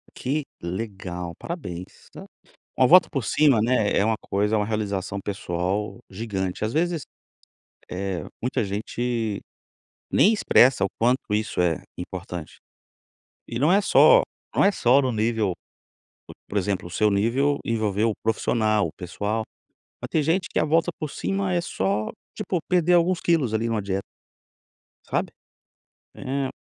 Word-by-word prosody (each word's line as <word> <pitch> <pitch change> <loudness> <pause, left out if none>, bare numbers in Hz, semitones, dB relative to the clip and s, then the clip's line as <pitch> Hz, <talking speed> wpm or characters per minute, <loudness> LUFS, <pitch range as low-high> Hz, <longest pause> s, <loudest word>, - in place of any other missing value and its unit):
Que 145 +3 -2 0.2
legal, 90 -2 -5
parabéns, 95 - -7
tá. - - -10 0.5
Uma 130 - +5
volta 180 +5 +7
por 135 -7 -2
cima, 140 -5 +4
né, 115 -2 +2
é 100 - +3
uma 110 0 +1
coisa, 105 +2 0
é - - +3
uma 105 - 0
realização 100 -3 -2
pessoal 95 +2 -3
gigante. 95 -2 -4
Ás 110 - -1
vezes, 165 +1 0 0.9
eh, 95 -2 -3 0.2
muita 125 -1 0
gente 110 +1 -2 0.7
nem 215 - +5
expressa 130 - +4
o - - 0
quanto 120 -2 +1
isso 105 -4 0
é 85 -2 +1 0.2
importante. 90 -2 -7 0.9
E 115 - -4
não 150 +7 +4
é 200 - +5
só - - +6 0.3
não - - +4
é 200 - +5
só 130 -5 +4
no 130 -2 0
nível, 110 -2 0 0.7
por - - -11
por 105 - -1
exemplo, 95 -2 -1
o - - -14
seu 105 +4 +2
nível 125 +8 +2
envolveu 110 -1 +1
o - - -3
profissional, 110 -2 +1
o - - -10
pessoal. 105 +5 -3 0.6
Mas - - -4
tem 155 - +2
gente 175 +5 +1
que - - -1
a - - +3
volta 165 +3 +2
por 155 -2 -4
cima 195 -1 -2
é 175 - +2
só, 100 - -1 0.3
tipo, 195 -4 -2
perder 180 -1 +3
alguns 175 +1 +3
quilos 150 -10 +1
ali 115 +1 0
numa 110 -2 -1
dieta. 95 0 -2 1.1
Sabe? - - -1 0.8
É. 135 0 -2
110 Hz, 155 wpm, -24 LUFS, 100-140 Hz, 1.1 s, volta